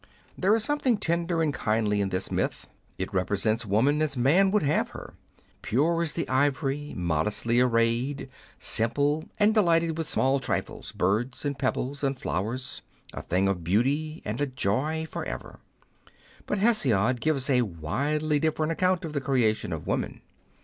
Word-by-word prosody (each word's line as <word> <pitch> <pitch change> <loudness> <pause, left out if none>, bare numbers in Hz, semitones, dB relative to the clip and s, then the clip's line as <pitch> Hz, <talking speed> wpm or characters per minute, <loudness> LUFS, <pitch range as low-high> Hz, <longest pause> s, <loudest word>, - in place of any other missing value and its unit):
There 200 +4 +3
is 225 - 0
something 265 -4 +1
tender 170 -2 0
and 150 -2 0
kindly 105 -5 0
in 100 - 0
this 90 0 -3
myth; - - -2 0.3
it 95 - -4
represents 105 +4 0
woman 135 +10 +2
as 150 -3 -1
man 160 +11 +4
would 210 -1 +2
have 145 +2 +1
her, - - -10 0.5
pure 165 +8 +1
as 160 -3 -1
the 165 - -2
ivory, 140 +2 0
modestly 90 +8 0
arrayed, 120 +3 +1 0.3
simple, 145 +7 +2
and 210 +1 +4
delighted 165 -5 +2
with 160 - -3
small 135 +1 +2
trifles, 130 - -3
birds, 115 +10 -1
and 140 -1 -2
pebbles,, 140 +1 -2
and 135 -1 0
flowers 120 +7 -3 0.2
— - - -21
a - - -5
thing 95 +2 0
of 95 -3 -1
beauty 140 - 0
and 110 +6 -3
a 145 - +1
joy 135 +7 -1
for - - -5
ever. - - -7 0.9
But 205 - -1
Hesiod 130 - +2
gives 145 -4 0
a 130 -3 +3
widely 140 - -1
different 155 +1 0
account 185 +1 +1
of 155 - -6
the 145 - -1
creation 125 -6 +1
of - - -5
woman. - - -3
135 Hz, 165 wpm, -27 LUFS, 115-155 Hz, 0.9 s, man